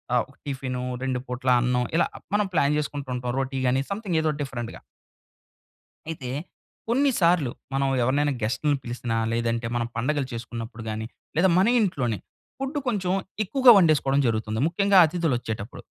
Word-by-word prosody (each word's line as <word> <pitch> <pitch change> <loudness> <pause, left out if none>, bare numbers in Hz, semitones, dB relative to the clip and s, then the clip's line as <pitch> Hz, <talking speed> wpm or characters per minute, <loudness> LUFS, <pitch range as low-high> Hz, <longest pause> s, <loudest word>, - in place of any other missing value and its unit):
ఆహ్, 120 - +3
ఒక 140 - -19
టిఫిను, 130 -3 -3 0.2
2 130 -1 -1
పూట్ల 125 +1 -2
అన్నం 125 0 +1
ఇలా 165 - +4 0.3
మనం 210 0 +3
ప్లాన్ 145 -3 +3
చేసుకుంటూ 145 -2 -3
ఉంటాం. 125 0 -3
రోటి 135 0 -2
గాని, 130 +1 +2
సమ్‌థింగ్ 200 -4 -1
ఏదో 160 - 0
ఒక 145 - -6
డిఫరెంట్‌గా. 120 -4 -5 1.3
అయితే 145 -6 -5 0.6
కొన్నిసార్లు 185 - +3 0.2
మనం 135 0 +1
ఎవరినైనా 145 +4 +2
గెస్ట్‌లని 140 +6 0
పిలిసినా, 120 -1 -3 0.2
లేదంటే 115 0 -1
మనం 120 -1 0
పండగలు 135 +4 0
చేసుకున్నప్పుడు 115 0 -6
గాని, 110 +1 -4 0.3
లేదా 180 +4 +4
మన 190 - +4
ఇంట్లోనే 130 - 0 0.4
ఫుడ్డు 270 +2 -2
కొంచెం 190 -6 0 0.3
ఎక్కువగా 260 +5 +6
వండేసుకోవడం 150 -6 +3
జరుగుతుంది. 110 -1 -1
ముఖ్యంగా 195 +3 +3
అతిథులొచ్చేటప్పుడు. 125 - -3
135 Hz, 145 wpm, -25 LUFS, 120-170 Hz, 1.3 s, ఎక్కువగా